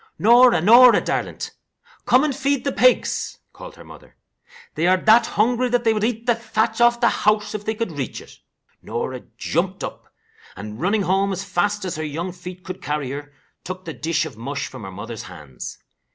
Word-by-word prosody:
"Norah! 240 -2 +6
Norah, 235 +6 +7
darlint! - - -3 0.6
Come 255 +3 +5
and 295 -3 0
feed 280 -1 0
the 280 - -1
pigs," 255 -1 +2 0.2
called - - -11
her - - -13
mother. - - -15 0.6
"They 165 +3 0
are 185 +1 +4
that 220 +5 +5
hungry 245 +4 +1
they 240 -2 +2
would 215 -1 -2
eat 230 0 -1
the 240 - +4
thatch 225 0 -1
off 240 0 +4
the 235 - +4
house 210 -1 +1
if 210 -1 -5
they 220 - -1
could 225 -4 -3
reach 145 -4 -5
it." - - -15 0.4
Norah - - -4 0.2
jumped - - -2
up, - - -8 0.4
and 105 +3 -8
running 200 +3 +1
home 195 +2 +1
as 190 0 -3
fast 205 +2 -1
as 175 -4 -4
her 155 - -3
young 160 +4 -4
feet 180 +1 -10
could 185 +1 -8
carry 145 -2 -3
her, 145 +1 -7 0.3
took 185 +1 -7
the 165 - -5
dish 160 0 -1
of - - -8
mush 140 +5 -4
from - - -9
her 95 - -7
mother's 110 +3 -7
hands. 75 -8 -9
200 Hz, 195 wpm, -22 LUFS, 155-235 Hz, 0.6 s, Norah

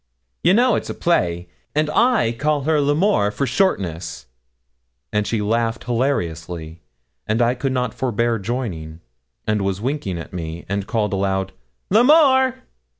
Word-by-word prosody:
'You 185 - +5
know 245 +1 +4
it's - - -2
a - - -4
play, 85 - 0 0.3
and 155 0 +2
I 225 - +3
call 145 +4 0
her 155 0 +2
L'Amour 145 - +2
for 105 +7 -2
shortness;' 90 - -1 0.9
and 105 0 +1
she 110 -2 -1
laughed 115 +2 0
hilariously, 85 - -2 0.5
and 110 +2 +1
I 120 0 +3
could 130 +2 -2
not 125 -3 -1
forbear 120 -2 0
joining; 95 -8 -4 0.4
and, 105 -1 0
winking 100 - -2
at 85 - -8
me, 85 -1 -6
she 100 0 -1
called 105 0 -1
aloud, 95 0 -1 0.4
'L'Amour.' 260 - +5
115 Hz, 140 wpm, -21 LUFS, 95-145 Hz, 0.9 s, You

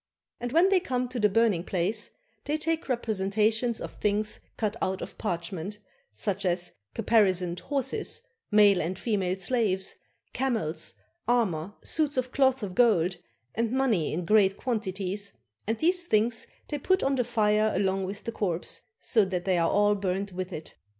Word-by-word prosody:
And 245 0 -4
when 335 +6 +5
they 390 -1 +5
come 250 -7 -2
to 250 -1 -4
the 210 -1 +4
burning 205 -4 +2
place, 190 +4 +1 0.4
they 300 +1 0
take 320 -1 -2
representations 220 0 +1
of - - -6
things 210 +1 -1 0.2
cut 215 -1 -1
out 190 0 -1
of - - -8
parchment, 180 0 -3 0.3
such 195 - -2
as 175 -1 0 0.2
caparisoned 185 -6 +2
horses, 290 - -1 0.3
male 205 -3 +5
and 175 +4 -3
female 195 -5 0
slaves, 195 -3 0 0.4
camels, 215 -12 -1 0.3
armor, 205 -6 +1
suits 300 -3 +1
of 255 0 0
cloth 265 -3 +2
of 190 -3 -4
gold, 185 -6 +3 0.4
and 230 0 0
money 245 - +1
in 170 +2 -3
great 200 -1 +4
quantities, 200 -4 -2 0.3
and 225 +1 0
these 350 +4 +2
things 225 0 +1 0.2
they 295 - -2
put 375 +7 +2
on 275 - +2
the 255 -2 +2
fire 215 -2 +2
along 190 0 +1
with 195 +2 -6
the 230 - -3
corpse, 180 -6 -2 0.2
so 220 -3 +3
that 185 -2 -2
they 185 -3 +2
are 165 - +2
all 205 0 +4
burnt 195 0 -2
with 185 +1 -4
it. 155 -2 -7
210 Hz, 165 wpm, -28 LUFS, 185-245 Hz, 0.4 s, when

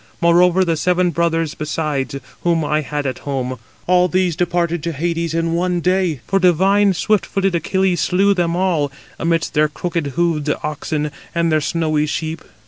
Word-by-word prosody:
Moreover, 180 +2 +4
the 165 -2 0
seven 180 +2 +1
brothers 165 -2 0
besides, 150 -3 -3 0.3
whom 165 -2 +1
I 150 +1 +1
had 145 0 -4
at 130 - -3
home, 130 -3 -3 0.3
all 180 0 +4
these 180 0 +1
indeed - - -10
departed 175 -1 0
to 165 +1 -3
Hades 165 +2 -2
in 165 0 0
one 175 +1 0
day. 180 -5 0
For 195 - +1
divine, 190 +2 +3
swift 210 +1 +1
footed 195 0 -1
Achilles 180 +1 +1
slew 195 +2 +3
them 175 -3 0
all, 170 -6 0 0.3
amidst 165 0 0
their 155 0 +3
crooked 170 0 -3
hoofed 165 -4 +1
oxen 150 0 -3 0.2
and 170 -1 +1
their 155 0 +2
snowy 155 -1 0
sheep. 160 +1 -3
170 Hz, 170 wpm, -19 LUFS, 155-180 Hz, 0.3 s, Moreover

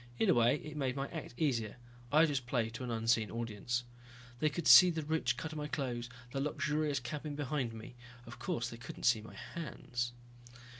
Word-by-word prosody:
In 210 - +4
a - - +6
way 120 +2 +4
it 150 0 -7
made 135 -4 -1
my 135 0 -2
act 160 -7 -7
easier, 120 -9 0 0.3
I 155 +3 +7
just 135 -5 -2
played 115 -4 0
to 120 - -6
an 125 - -4
unseen 115 -1 +2
audience. 115 +1 -2 0.6
They 155 - +3
could 160 +1 -3
see 180 - +10
the 160 -2 -2
rich 150 -6 0
cut 160 +2 -4
of 155 - -5
my 150 - -3
clothes, 125 -5 -3 0.2
the 135 - -2
luxurious 150 -1 0
cabin 145 +3 -5
behind 140 -4 -1
me. 115 +2 -9 0.3
Of - - -10
course 180 -4 -2
they 115 - -8
couldn't 120 - -9
see 120 -3 +4
my 110 - -12
hands. 120 -7 -4
135 Hz, 200 wpm, -34 LUFS, 120-150 Hz, 0.6 s, see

